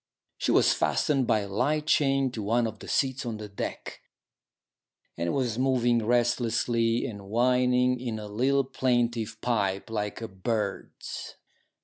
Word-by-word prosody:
She - - -1
was - - +5
fastened 135 -5 +1
by 110 - +3
a 100 - -5
light 135 +10 0
chain 135 -3 +2
to 115 - -5
one 115 +4 +1
of 110 -1 -5
the - - -10
seats 135 -1 0
on 115 -3 -4
deck, 105 -2 -6 1.1
and 85 0 -1
was 125 -4 -1
moving 120 -3 +2
restlessly 120 -1 +1
and 100 -4 -7
whining 125 +2 +2
in 120 -3 -3
a 105 - -6
little 130 +6 +1
plaintive 120 -4 -1
pipe 100 -3 -1
like 105 -2 -3
a 115 - -5
bird's. 100 +1 -4
120 Hz, 140 wpm, -27 LUFS, 110-125 Hz, 1.1 s, was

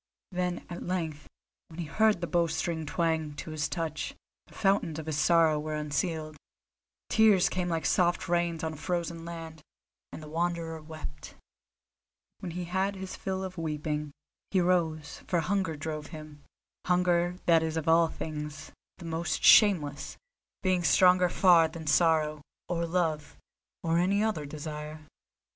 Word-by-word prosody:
Then 180 -1 -2
at 175 - -7
length, 165 -5 -3 0.4
when 165 +1 -12
he 170 - -2
heard 215 +3 +2
the - - 0
bowstring 165 -1 -1
twang 160 -2 -1
to 155 - -7
his 155 -1 -2
touch, 165 -3 -3 0.3
the - - -19
fountains 195 -6 +1
of 160 - -6
his 155 -2 -2
sorrow 160 -1 +4
were 155 +1 -3
unsealed; 155 +1 -2 0.7
tears 215 -5 +5
came 180 -1 -2
like 165 -1 -1
soft 175 0 +2
rains 170 -2 0
on 160 0 -2
a - - -9
frozen 170 0 -3
land, 165 -2 -8 0.5
and 155 - -8
the - - -9
Wanderer 165 0 -2
wept. 155 -2 -9 1.0
When 175 -3 -6
he 180 +1 -4
had 190 +3 -1
his 190 0 -6
fill 190 0 -3
of 185 -2 -6
weeping, 150 -1 -3 0.4
he 190 - +2
rose, 165 -4 0
for 175 - +1
hunger 185 -2 -1
drove 150 0 -5
him—hunger 175 +3 -2
that 165 -2 +5
is 160 0 -2
of 160 - -3
all 165 +1 +5
things 150 -1 -6 0.3
the 175 - -10
most 165 0 -2
shameless, 160 -10 +5 0.5
being 185 -2 +2
stronger 180 +1 +5
far 175 -3 +5
than 160 0 -9
sorrow, 155 -1 +2 0.3
or 170 -1 -1
love, 160 -4 -1 0.5
or 165 0 +2
any 200 +4 +2
other 185 -10 -1
desire. 150 +1 -7
165 Hz, 150 wpm, -29 LUFS, 155-180 Hz, 1.0 s, tears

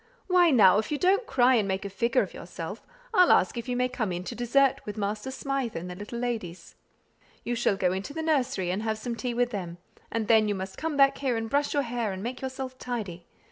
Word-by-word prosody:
Why 360 -2 +5
now, 205 - +6
if 220 - -4
you 300 - 0
don't 390 - +2
cry 250 0 +4
and 215 -5 +2
make 190 +1 -2
a - - -3
figure 235 +4 +2
of - - -8
yourself, - - -8 0.3
I'll 365 -4 +6
ask 185 - +4
if 235 +1 -5
you 250 - 0
may 250 +1 +2
come 245 -6 -3
in 175 0 -3
to - - -5
dessert 265 +3 +2
with 210 0 -7
Master 210 +4 -2
Smythe 270 -2 -3
and 180 +2 -5
the - - -7
little 205 +5 -7
ladies. 225 -8 -4 0.7
You 240 - -2
shall 230 -4 +1
go 180 -1 +1
into 190 +7 -4
the 320 +2 -4
nursery, 255 - 0
and 190 +3 -2
have 220 -1 -1
some 235 +2 -4
tea 240 0 -3
with 245 0 +1
them; 175 -5 -5 0.3
and 225 -2 -2
then 220 -1 +5
you 205 - 0
must 190 0 -6
come 315 -2 -3
back 275 0 +4
here 260 -4 0
and 225 0 -3
brush 285 +1 +1
your 285 - +2
hair 235 -3 -2
and 190 +1 -6
make 245 +2 -5
yourself 260 0 -5
tidy. 200 -9 -5
235 Hz, 245 wpm, -27 LUFS, 200-265 Hz, 0.7 s, now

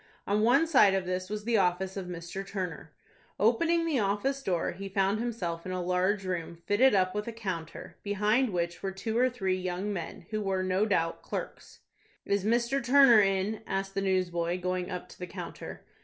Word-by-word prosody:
On 205 +1 +1
one 245 +8 +5
side 255 -12 +5
of 190 -1 -1
this 185 +1 -3
was 210 0 -4
the 235 -1 +2
office 185 0 +1
of 190 -2 -5
Mr. 175 +2 -6
Turner. 180 -5 -5 0.5
Opening 330 - +3
the 310 -6 +1
office 210 +7 0
door, 180 -9 -1
he 195 +3 -7
found 195 +2 +1
himself 185 -9 -3
in 185 - -5
a 185 - -2
large 185 +3 +1
room 170 -2 -3
fitted 220 +3 +4
up 185 -1 +2
with 210 +1 -3
a - - -2
counter, 190 -8 -6
behind 210 +5 +1
which 170 -2 -2
were 195 - -2
two 210 +4 -4
or 250 +2 +4
three 190 -7 -1
young 185 +3 -3
men, 175 0 -6
who 215 -1 -1
were, 190 -2 0
no 185 +3 +1
doubt, 165 -5 0
clerks. - - -7 0.4
"Is 200 -1 0
Mr. 235 +5 +1
Turner 250 -3 +7
in?" 195 +2 0
asked 195 0 -2
the 195 - -1
newsboy, 180 -2 0
going 180 0 -2
up 180 -2 -5
to - - -15
the 180 - -5
counter. - - -8
195 Hz, 195 wpm, -29 LUFS, 185-220 Hz, 0.5 s, Turner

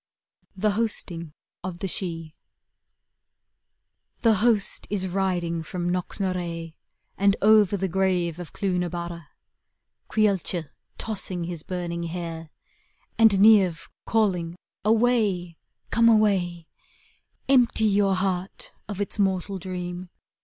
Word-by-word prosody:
THE 210 +2 +2
HOSTING 195 -7 -1 0.3
OF 180 -1 -5
THE 195 - -3
SIDHE 165 -3 -4 1.9
The 225 -2 +5
host 215 -1 +2
is 200 -2 -1
riding 175 -3 -1
from 175 +2 -4
Knock?iarea, 175 -2 -3 0.5
And 200 0 +4
over 210 -2 +5
the 190 0 -1
grave 180 -2 0
of 175 -3 -8
Clooth 185 -3 -1
na 180 -1 -1
bare; 170 -2 -6 0.8
Caolte 190 -6 +1 0.3
tossing 195 -5 -3
his 170 -2 -5
burning 175 -1 -4
hair, 165 -1 -6 0.7
Aftd 220 -3 +6
Niamh 195 -5 +5 0.2
calling, 180 -7 +1 0.2
' - - -68
Away, 215 -8 +1 0.3
come 230 0 +5
away; 190 -6 +2 0.8
Empty 245 -4 +4
your 200 -2 +3
heart 185 0 -3 0.2
of 205 -2 -6
its 205 +1 -2
mortal 195 0 0
dream. 180 0 -6
185 Hz, 110 wpm, -25 LUFS, 175-205 Hz, 1.9 s, Aftd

